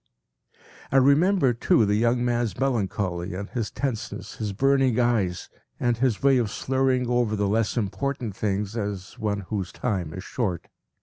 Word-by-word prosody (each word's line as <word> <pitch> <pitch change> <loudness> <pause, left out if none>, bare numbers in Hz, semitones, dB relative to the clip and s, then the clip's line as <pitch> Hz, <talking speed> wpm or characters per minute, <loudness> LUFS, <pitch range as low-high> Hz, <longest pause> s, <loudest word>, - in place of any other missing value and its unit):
” - - -24
I 135 - +4
remembered, 140 - +4
too, 110 - +4
the 105 - +1
young 120 +3 +2
man’s 120 -5 0
melancholy 95 -8 -1
and 100 +2 -5
his 115 -5 -2
tenseness, 130 -6 -4
his 105 -2 -3
burning 135 +2 +2
eyes, 110 -8 +1 0.3
and 120 -1 +1
his 125 -1 0
way 135 -2 +5
of 115 -3 0
slurring 130 0 0
over 120 -3 +1
the 100 -1 0
less 110 +3 0
important 120 +1 -2
things, 100 +1 -2
as 100 -4 -4
one 100 -2 -1
whose 95 -1 -4
time 95 -10 -2
is 95 - -6
short. 95 -9 -3
115 Hz, 165 wpm, -25 LUFS, 100-125 Hz, 0.3 s, way